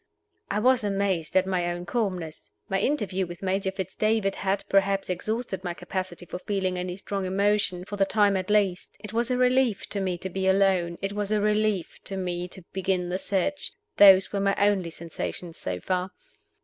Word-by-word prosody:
I 200 - 0
was 250 +2 +3
amazed 195 -4 0
at 185 - +4
my 180 -2 0
own 175 0 -4
calmness. 180 -7 -3 0.2
My 195 - 0
interview 200 -7 0
with 175 +2 -9
Major 190 +1 0
Fitz 190 -2 -5
David 215 -2 +1
had, 195 0 0
perhaps, 195 -1 +2
exhausted 200 +1 -3
my 175 -2 -3
capacity 180 0 -5
for 180 - -6
feeling 190 -2 -1
any 180 0 -3
strong 195 0 -3
emotion, 195 -1 +1
for 205 +1 -6
the 195 - +4
time 205 -1 +3
at 185 0 -2
least. 200 -4 +1
It 210 -1 -9
was 235 +2 +1
a 250 - +1
relief 250 -3 +2
to 200 - -2
me 185 -2 -1
to 190 +2 -5
be 190 +1 -1
alone; 190 -3 +3
it 195 +1 -1
was 205 0 -2
a 215 - +3
relief 210 -3 0
to 195 - -4
me 180 -1 -2
to 185 0 -13
begin 185 -2 0
the 185 +1 -1
search. 200 +11 -1 0.2
Those 195 -1 +8
were 200 - 0
my 195 0 +2
only 200 -4 +2
sensations 170 +1 -6
so 90 -1 -3
far. 185 - -1
195 Hz, 195 wpm, -26 LUFS, 180-205 Hz, 0.2 s, Those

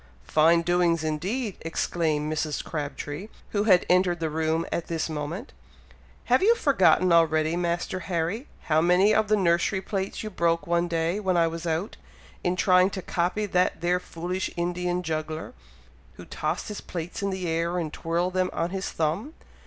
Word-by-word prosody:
"Fine 165 +2 +4
doings 175 -2 +2
indeed!" 190 - -2
exclaimed 155 -2 -1
Mrs. 155 -1 -2
Crabtree, 150 +4 -5 0.2
who 205 0 0
had 185 -5 +5
entered 180 -1 +3
the 160 -2 -2
room 160 +1 0
at 170 - -2
this 165 -1 -2
moment. 160 - -5 0.7
"Have - - +3
you 450 +4 +5
forgotten 190 - +3
already, 160 -1 +3
Master 175 +1 -1
Harry, 185 - -2
how 155 0 +2
many 180 +5 +4
of 220 0 +2
the 215 - +4
nursery 175 +1 +2
plates 195 +1 -4
you 215 - -5
broke 170 -2 +1
one 170 0 +1
day 170 +3 0
when 190 -3 +1
I 170 - +4
was 165 +1 -4
out, 165 +5 -2 0.5
in 180 0 +1
trying 185 0 +4
to 190 -2 -6
copy 180 +5 -1
that 180 -4 +1
there 175 +1 +2
foolish 180 +2 -4
Indian 180 +1 -1
juggler, 155 -1 -4 0.6
who - - -12
tossed - - -3
his 210 - -6
plates 175 +4 -6
in 200 - 0
the 190 -2 -3
air, 165 +2 0
and 160 -3 -3
twirled 170 +2 -1
them 185 0 +1
on 170 +1 -1
his 195 0 -3
thumb! 165 - -2
175 Hz, 170 wpm, -26 LUFS, 165-185 Hz, 0.7 s, had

